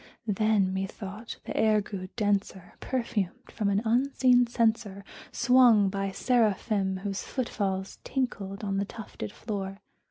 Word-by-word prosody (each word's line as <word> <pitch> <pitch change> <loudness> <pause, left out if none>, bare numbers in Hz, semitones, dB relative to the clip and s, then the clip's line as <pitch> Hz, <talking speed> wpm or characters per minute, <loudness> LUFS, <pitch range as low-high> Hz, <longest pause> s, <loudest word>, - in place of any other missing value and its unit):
Then, 210 -2 +2
methought, 195 +3 -5
the - - -5
air 215 -1 +4
grew 195 -2 -6
denser, 200 -4 -1
perfumed 230 -7 -3
from 210 -3 -1
an 200 +2 +1
unseen 250 +1 +4
censer 220 -4 0 0.3
Swung 240 -5 +5
by 195 0 -2
seraphim 205 -3 +1
whose 200 -1 -2
foot 255 -3 -3
falls 190 -2 -3
tinkled 205 -7 -3
on 195 -1 -1
the 200 - 0
tufted 200 - -7
floor. 195 -3 -5
205 Hz, 130 wpm, -28 LUFS, 195-230 Hz, 0.3 s, Swung